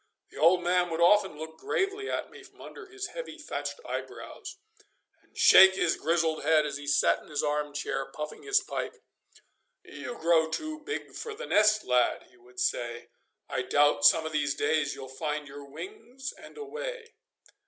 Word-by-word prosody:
The - - -14
old 175 +3 +5
man 180 0 +2
would 165 0 -3
often 190 -1 +4
look 160 +1 -9
gravely 400 +2 -2
at - - -3
me - - -13
from - - -19
under 430 - -11
his 400 +1 -6
heavy - - -7
thatched - - -5
eyebrows, - - -7 0.6
and - - -25
shake 445 - +8
his 175 -3 +1
grizzled 160 0 0
head 155 +1 +3
as 140 -2 -3
he 145 0 -10
sat 145 - +3
in - - -17
his 150 -1 -2
arm 150 0 -1
chair 135 -2 -3
puffing 150 +1 -7
his 410 -1 +2
pipe. 400 - -5 0.9
'You 245 - -8
grow 160 -1 +3
too 310 - -4
big 425 +8 -6
for 445 -2 -6
the - - -7
nest, 215 0 +4
lad,' 125 -1 +1
he - - -23
would 125 +1 -14
say. 120 -1 -2 0.4
'I - - -2
doubt 145 0 +2
some 160 +2 +6
of 160 - -4
these 145 -2 0
days 155 -2 0
you'll 135 - -8
find 150 +2 -4
your 145 0 -10
wings 225 - -8
and - - -14
away! 460 +2 -7
165 Hz, 180 wpm, -28 LUFS, -, 0.9 s, shake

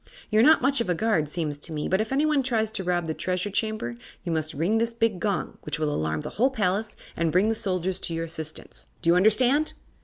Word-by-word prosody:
You're 215 +1 +5
not 305 +2 +6
much 275 -1 +3
of 230 - -2
a 180 - +2
guard, 165 -7 +1
seems 150 -3 -3
to 165 - -7
me, 150 -1 -2
but 190 +2 +2
if 220 - -4
anyone 295 +1 +2
tries 225 -4 0
to 195 - -2
rob 175 -1 0
the 160 - -2
Treasure 185 +4 -2
Chamber 215 - -2 0.3
you 175 - -3
must 155 -2 -2
ring 180 +10 +1
this 230 0 -1
big 225 -5 +1
gong, 200 0 -2
which - - -3
will 150 -1 0
alarm 80 0 -1
the - - -6
whole 260 - +6
palace 210 -3 -1 0.2
and 165 -1 0
bring 185 +6 +3
the - - +2
soldiers 185 -3 -1
to 165 - -3
your 165 0 -2
assistance. 160 -1 -7 0.2
Do 170 - +4
you - - +5
understand?" 250 +10 +3
190 Hz, 240 wpm, -26 LUFS, 165-225 Hz, 0.3 s, not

